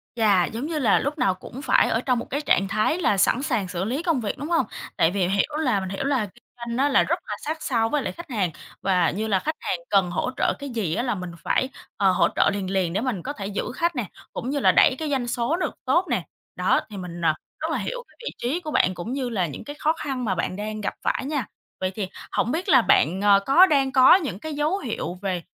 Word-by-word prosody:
Chà, 200 -6 +4
giống 235 +6 -5
như 315 -1 -2
là 225 -7 +4
lúc 295 +3 -2
nào 190 -8 +2
cũng 240 +8 -10
phải 265 - +3
ở 225 - +1
trong 250 -2 +1
một - - -5
cái 285 +3 -1
trạng 195 -9 +2
thái 215 - +1
là 210 - +2
sẵn 220 +6 +3
sàng 210 -8 0
xử 180 0 -3
lý 260 - -2
công 320 -8 +1
việc, 205 - -3
đúng 295 +3 -5
hông? 335 -1 +2 0.3
Tại 165 - +4
vì 185 -3 +1
hiểu 200 +11 0
là 250 -10 +2
mình 190 -1 -5
hiểu 195 +8 -3
là 270 -6 +1
kinh 235 +4 -17
doanh 235 0 -4
á 280 +2 +3
là 265 - +4
rất 345 +2 0
là 210 - -3
sát 315 +1 -3
sao 225 -3 +1
với 295 -2 +1
lại - - -2
khách 345 -3 -10
hàng, 195 -8 0 0.3
và 180 -3 +2
như 215 +4 -3
là 195 -3 +2
khách 310 +7 -2
hàng 175 - -2
cần 190 -3 +3
hỗ 255 - -1
trợ - - +2
cái 280 - -6
gì 210 -9 -2
á 235 - 0
là 245 -4 0
mình 180 -2 -6
phải, 260 - +1 0.3
ờ, 195 -2 +4
hỗ - - +3
trợ - - +4
liền 195 -2 -3
liền 185 -3 0
để 205 - 0
mình 240 -9 -2
có 285 - -4
thể 200 -6 -5
giữ 205 +4 -3
khách 340 -1 0
nè, 240 - -1 0.3
cũng 250 - -4
như 285 0 0
là - - +5
đẩy 260 - +5
cái 310 -2 -2
doanh 260 -4 0
số 240 +6 0
được - - -2
tốt 360 +2 +3
nè. 225 -8 0 0.3
Đó, 180 +1 +2
thì 205 - -8
mình, 175 -2 -7
ờ, 160 -2 +3 0.3
rất - - -2
là - - 0
hiểu - - -4
cái - - -25
vị - - -2
trí 275 +9 -1
của 310 -3 -6
bạn 185 - +3
cũng 180 +8 -5
như 265 -3 -2
là 190 -6 0
những 145 - -8
cái 290 - -8
khó 310 +1 +2
khăn 270 -6 -4
mà 190 -4 0
bạn 180 +2 -2
đang 215 +1 -4
gặp - - -2
phải - - -1
nha. 280 -5 -1 0.3
Vậy 185 0 -1
thì 195 -4 -3 0.2
hổng 240 - 0
biết 350 +5 -2
là 260 -7 +7
bạn, 185 -1 +3
ờ, 200 -1 +6
có 345 +8 +7
đang 275 -5 +2
có 260 +3 +8
những 285 - -2
cái 315 +3 -5
dấu 300 +6 0
hiệu 225 - -4
về, 185 -4 -2
235 Hz, 275 wpm, -24 LUFS, 195-285 Hz, 0.3 s, có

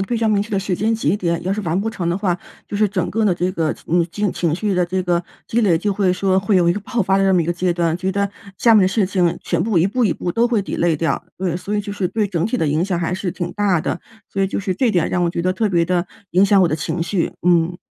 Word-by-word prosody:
非 215 +5 -1
常 225 -1 +1
明 205 -1 +2
确 225 - -10
的 200 - +1
时 195 -1 -1
间 220 +5 0
节 205 -5 +1
点。 170 -4 -1
要 190 - 0
是 215 - -2
完 180 -1 -1
不 220 - -2
成 180 -6 -3
的 175 +3 0
话， 180 -4 0 0.3
就 205 - -4
是 210 0 +3
整 185 -3 -1
个 220 +2 0
的 195 - +3
这 180 +2 -1
个， 160 -4 0
嗯 170 +1 +2 0.3
情 165 -3 -1
绪 200 +3 -1
的 180 -1 +2
这 185 +2 -2
个 175 -1 +1 0.2
积 235 - 0
累 180 -7 +3
就 205 +2 0
会 190 -2 +1
说 190 0 +1
会 195 0 +2
有 175 -1 +3
一 - - +4
个 205 - -4
爆 240 +2 -2
发 190 -1 +2
的 195 - +2
这 190 - +3
么 180 - +4
一 - - 0
个 175 - +1
阶 180 0 0
段， 170 -1 0
觉 185 +1 -2
得 200 +1 0 0.3
下 230 -2 +5
面 205 - +6
的 185 - +4
事 195 0 +1
情 175 -3 +1
全 170 0 0
部 210 -6 +1
一 170 - +3
步 240 +4 0
一 195 - +2
步 175 - -3
都 235 +1 +2
会 230 -4 +1
delay 170 -4 0
掉。 165 +2 -1
对， 175 -2 -1
所 205 +3 -3
以 - - +1
就 205 0 -6
是 195 -3 -1
对 215 -2 0
整 170 -4 -1
体 240 +5 0
的 160 - 0
影 155 +4 +1
响 185 -3 -1
还 175 +1 -1
是 185 -1 -3
挺 175 -1 -4
大 195 -5 +1
的。 175 - -3 0.3
所 195 - -1
以 - - +3
就 - - -3
是 190 -2 -2
这 245 +2 +2
点 175 -5 +1
让 180 - 0
我 170 - +1
觉 170 - -3
得， 185 +1 +1
特 210 +3 0
别 170 -3 +2
地 180 0 0 0.3
影 185 +2 +4
响 200 0 +4
我 - - +5
的 155 - 0
情 160 +2 -3
绪。 170 +1 -1
嗯。 175 0 +3
185 Hz, 350 characters per minute, -20 LUFS, 175-205 Hz, 0.3 s, 面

